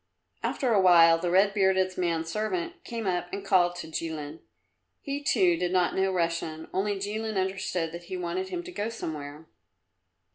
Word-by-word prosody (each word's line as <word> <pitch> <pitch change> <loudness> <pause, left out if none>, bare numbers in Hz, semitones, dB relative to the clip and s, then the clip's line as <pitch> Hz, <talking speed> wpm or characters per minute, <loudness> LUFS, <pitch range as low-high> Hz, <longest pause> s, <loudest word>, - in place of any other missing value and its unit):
After 255 -5 0
a 200 - +4
while 165 -2 +7
the 175 - -1
red 195 +3 +4
bearded 190 -2 +2
man's 165 -2 -1
servant 190 -4 -3
came 230 -2 -5
up 180 -1 -1
and 200 0 -5
called 175 -3 +3
to 175 - -7
Jilin. 160 -1 -5 0.6
He 285 0 -4
too, 180 -10 +3
did 175 +1 -1
not 180 -1 +2
know 190 0 +1
Russian, 165 -2 -2
only 205 +2 0
Jilin 215 +2 -3
understood 185 -3 -1
that 170 +1 -8
he 185 - -5
wanted 180 +2 -3
him 350 - -4
to 360 - -9
go 220 -9 -3
somewhere. 155 -8 -6
185 Hz, 175 wpm, -28 LUFS, 170-200 Hz, 0.6 s, while